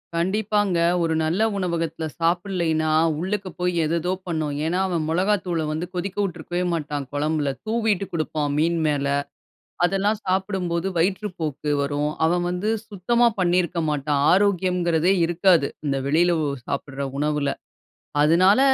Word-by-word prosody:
கண்டிப்பாங்க. 200 +2 +1 0.2
ஒரு 165 -1 +1
நல்ல 160 +6 0 0.2
உணவகத்துல 165 -3 -2 0.2
சாப்பிடலைன்னா, 170 -2 +1 0.3
உள்ளுக்க 195 +3 -2
போய் 180 0 0
ஏதேதோ 170 +3 0 0.2
பண்ணும். 155 -4 -2
ஏனா, 175 +3 0
அவன் 170 -4 -1
மிளகாய்த்தூளை 180 -2 0
வந்து 155 +3 -2
கொதிக்க 185 +2 -3
விட்டுருக்கவே 175 -1 -3
மாட்டான், 150 -3 -3
குழம்பில. 150 0 0
தூவிட்டு 220 -3 0
குடுப்பான் 155 -2 -1
மீன் 165 +2 +2
மேல. 145 -2 0 0.8
அதெல்லாம் 195 +4 +1
சாப்பிடும்போது, 185 -2 -1
வயிற்றுப்போக்கு 175 -5 -1
வரும். 145 +1 -1
அவன் 175 +2 +1
வந்து 180 +4 -2 0.2
சுத்தமா 235 +4 +2
பண்ணியிருக்க 175 -1 +1
மாட்டான். 145 -1 0
ஆரோக்கியம்ங்கிறதே 180 -2 +2
இருக்காது. 175 -2 +3 0.2
இந்த 135 -1 0
வெளியில 170 +4 +3
ஒ - - 0 0.2
சாப்பிடுற 140 0 -3
உணவுல. 150 -1 0 0.7
அதுனால 185 - +5
170 Hz, 120 wpm, -23 LUFS, 155-185 Hz, 0.8 s, அதுனால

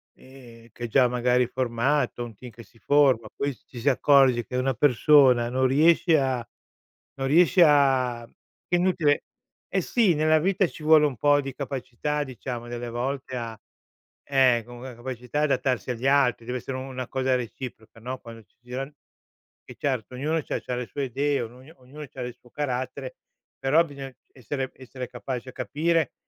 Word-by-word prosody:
che 120 -3 -14
è - - -3
già 125 +2 +4
magari 125 0 +2
è - - -8
formato, 125 +1 0
un 120 -1 -8
team 125 +5 -11
che 115 +1 -13
si 115 - -24
forma, 135 -6 +3
poi 140 0 -2
s - - -25
ci 120 - -10
si 125 - +2
accorge 135 -3 +4
che 125 - -7
una 130 +1 +1
persona 130 -1 +4
non 130 +1 +2
riesce 160 +3 +4
a 130 -3 -1 0.7
non 135 0 -2
riesce 175 +5 +4
a 130 -5 +3 0.4
che 175 - +1
è - - 0
inutile 170 -5 +2 0.5
eh - - +1
sì, 225 -7 +2
nella 155 +1 +3
vita 190 +3 +2
ci 160 - -12
vuole 155 -1 +6
un 140 -5 -2
po' 145 +4 +4
di 135 -1 -6
capacità 140 +2 -3
diciamo 125 -2 -7
delle 120 0 -5
volte 130 +3 -4
a, 115 -2 -5 0.7
ehm, 130 -4 +4
com 120 +1 -11
ehm, 130 -2 -8
capacità 125 +3 -4
adattarsi 130 -3 0
agli 120 +2 -4
altri, 135 -4 +3
deve 125 +1 -3
essere 130 +2 -6
u - - -5
una 130 -2 -6
cosa 130 -1 0
reciproca, 115 -2 -8
no, 130 +3 -5
quando 115 -1 -12
ci 95 - -41
giran 130 +4 -6 0.7
e - - -11
certo 130 -4 -2
ognuno 155 +5 -1
c'ha - - -3
c'ha 125 - -4
le 125 0 -4
sue 140 +3 -4
idee, 140 +3 0
ognu 125 +6 -10
ognuno 140 +4 -11
c'ha 130 - -11
del 125 -1 -5
suo 125 0 -23
carattere; 130 -1 -4 0.4
però 135 +5 +4
bisogna 140 -4 -9 0.2
essere 130 +1 -4
essere 130 -1 -8
capaci 125 +1 -6
a - - -8
capire 160 +1 0
130 Hz, 185 wpm, -25 LUFS, 120-145 Hz, 0.7 s, vuole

